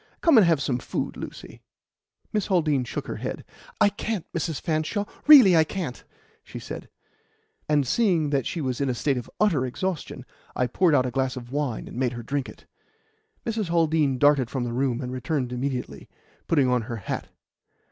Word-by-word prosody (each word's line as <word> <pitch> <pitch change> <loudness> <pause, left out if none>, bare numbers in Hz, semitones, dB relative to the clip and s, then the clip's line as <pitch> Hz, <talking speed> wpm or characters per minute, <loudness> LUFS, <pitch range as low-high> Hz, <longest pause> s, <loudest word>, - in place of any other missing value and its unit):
Come 330 -4 +5
and 190 - +5
have 165 -4 +3
some 130 -2 -1
food, - - -4
Lucy." - - -9 0.7
Miss 210 -3 0
Haldean 155 -9 +2
shook - - -5
her - - -5
head. - - -5 0.3
"I - - +6
can't, 205 -2 -4
Mrs. 165 -2 -3
Hanshaw 160 +5 -1 0.2
really 255 - +9
I 160 - +6
can't," 160 -6 -5 0.4
she - - -10
said; - - -8 0.8
and, 145 -2 +3
seeing 170 - +2
that 135 -4 0
she 170 - -3
was 130 -1 -2
in 140 - +1
a 125 - -1
state 140 +2 0
of 120 - -10
utter 180 -11 +3
exhaustion, 145 -1 -4 0.3
I 125 - +1
poured 155 +6 +2
out 130 - +3
a 125 - -2
glass 130 +1 -1
of 120 0 -8
wine 140 -5 -2
and - - -9
made 125 -1 0
her 120 -1 -6
drink 140 +3 -2
it. - - -14 0.8
Mrs. 220 -5 -2
Haldean 160 -5 +2
darted 145 -3 +4
from 130 -3 -2
the 120 -1 -3
room, 130 0 0
and 125 -1 -4
returned 130 -1 -2
immediately, 125 0 -4 0.4
putting 145 -6 +3
on 125 -1 +2
her 120 - -3
hat. 100 - -4
140 Hz, 190 wpm, -25 LUFS, 125-170 Hz, 0.8 s, really